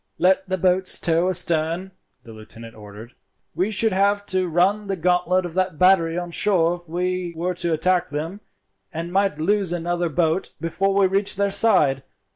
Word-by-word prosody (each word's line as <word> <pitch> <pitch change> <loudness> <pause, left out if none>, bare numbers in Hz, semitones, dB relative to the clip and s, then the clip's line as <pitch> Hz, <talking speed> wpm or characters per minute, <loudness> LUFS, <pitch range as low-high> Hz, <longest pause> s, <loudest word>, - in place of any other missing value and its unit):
"Let 190 +1 +1
the 185 - -1
boats 185 +1 +1
tow 170 +2 +1
astern," 170 +1 0 0.3
the 115 - -12
lieutenant 115 +1 -12
ordered. 105 +2 -12 0.4
"We 185 +6 -1
should 220 +1 +1
have 200 +1 +1
to 185 -1 0
run 190 +5 +1
the 195 - -2
gauntlet 180 +1 +1
of 175 - -7
that 185 -2 -1
battery 175 -2 +3
on 175 -1 -5
shore 170 -3 +2
if 175 -1 -11
we 180 0 -3
were 180 +2 -2
to 175 -1 -3
attack 180 +3 +1
them, 165 +7 -5 0.5
and 170 +1 -6
might 195 -4 +1
lose 195 +3 0
another 175 0 -2
boat 165 +2 -1
before 195 +4 -1
we 200 -1 +4
reached 195 +1 0
their 200 0 0
side. 150 -11 +3
180 Hz, 175 wpm, -22 LUFS, 165-190 Hz, 0.5 s, we